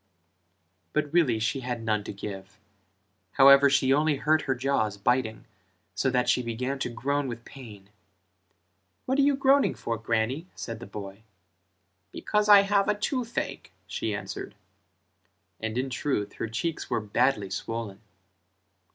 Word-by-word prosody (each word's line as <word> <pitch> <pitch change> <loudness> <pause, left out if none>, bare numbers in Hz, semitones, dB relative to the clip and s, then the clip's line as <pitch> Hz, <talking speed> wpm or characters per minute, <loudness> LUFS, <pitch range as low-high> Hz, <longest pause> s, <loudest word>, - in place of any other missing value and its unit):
But 150 0 -1
really 150 -10 +3
she 110 +5 -1
had 120 -2 -4
none 110 -2 0
to - - -5
give, 100 0 -8 0.8
however 140 +1 +7
she 135 -1 +3
only 150 +1 +2
hurt 150 +3 +2
her 130 - +2
jaws 120 -6 0
biting 110 +1 0 0.5
so 130 +7 0
that 125 -1 +1
she - - +3
began 125 +3 -3
to 125 - -2
groan 140 +4 -1
with 120 -1 -7
pain: 105 -7 -12 1.1
"What 265 +2 0
are - - +6
you 280 0 +4
groaning 275 +1 +3
for, 115 -1 -4
Grannie?" 115 +8 -1
said 115 -2 -6
the 120 - -9
boy; 100 0 -8 0.9
"Because 210 0 -1
I 205 -1 +10
have 200 +1 +1
toothache" 240 0 -3
she 110 -2 -3
answered: 105 - -7 1.0
and 110 +1 -3
in 130 +1 -2
truth 125 -5 -2
her - - -4
cheeks 135 +9 -3
were - - +1
badly 105 -1 0
swollen. 110 0 -5
125 Hz, 145 wpm, -27 LUFS, 110-145 Hz, 1.1 s, I